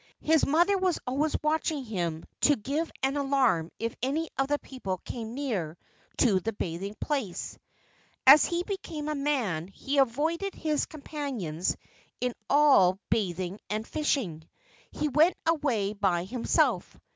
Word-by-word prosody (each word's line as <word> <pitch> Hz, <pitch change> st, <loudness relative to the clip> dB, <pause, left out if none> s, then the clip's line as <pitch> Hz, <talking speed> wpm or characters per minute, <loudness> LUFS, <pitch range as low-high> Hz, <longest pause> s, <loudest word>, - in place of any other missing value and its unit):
His 320 Hz, 0 st, +3 dB
mother 350 Hz, +7 st, +3 dB
was 370 Hz, -3 st, +1 dB
always 285 Hz, +5 st, 0 dB
watching 305 Hz, -1 st, 0 dB
him 170 Hz, -7 st, -3 dB
to 295 Hz, -, +5 dB
give 280 Hz, +8 st, -2 dB
an 270 Hz, +2 st, +1 dB
alarm 265 Hz, -, +2 dB
if 230 Hz, 0 st, -3 dB
any 300 Hz, +6 st, -1 dB
of 270 Hz, -, +1 dB
the 290 Hz, +1 st, +1 dB
people 225 Hz, -10 st, -5 dB
came 230 Hz, -1 st, -6 dB
near 200 Hz, -, -3 dB, 0.4 s
to 205 Hz, -7 st, +4 dB
the 225 Hz, +5 st, -3 dB
bathing 195 Hz, +2 st, -4 dB
place. 265 Hz, -, -3 dB, 0.7 s
As 275 Hz, +3 st, +10 dB
he 345 Hz, 0 st, -1 dB
became 340 Hz, -6 st, -5 dB
a -, -, 0 dB
man 255 Hz, -, -1 dB
he 270 Hz, +8 st, -2 dB
avoided 315 Hz, +9 st, +1 dB
his 305 Hz, -2 st, -1 dB
companions 270 Hz, -, -3 dB, 0.4 s
in 250 Hz, -1 st, -1 dB, 0.2 s
all 270 Hz, -11 st, +5 dB
bathing 185 Hz, -1 st, -1 dB
and 215 Hz, +1 st, -2 dB
fishing. 200 Hz, -, -1 dB, 0.4 s
He 300 Hz, -, -2 dB
went 305 Hz, +6 st, +4 dB
away 270 Hz, -11 st, +1 dB
by 190 Hz, -4 st, +1 dB
himself. 235 Hz, +6 st, 0 dB
270 Hz, 140 wpm, -28 LUFS, 195-300 Hz, 0.7 s, As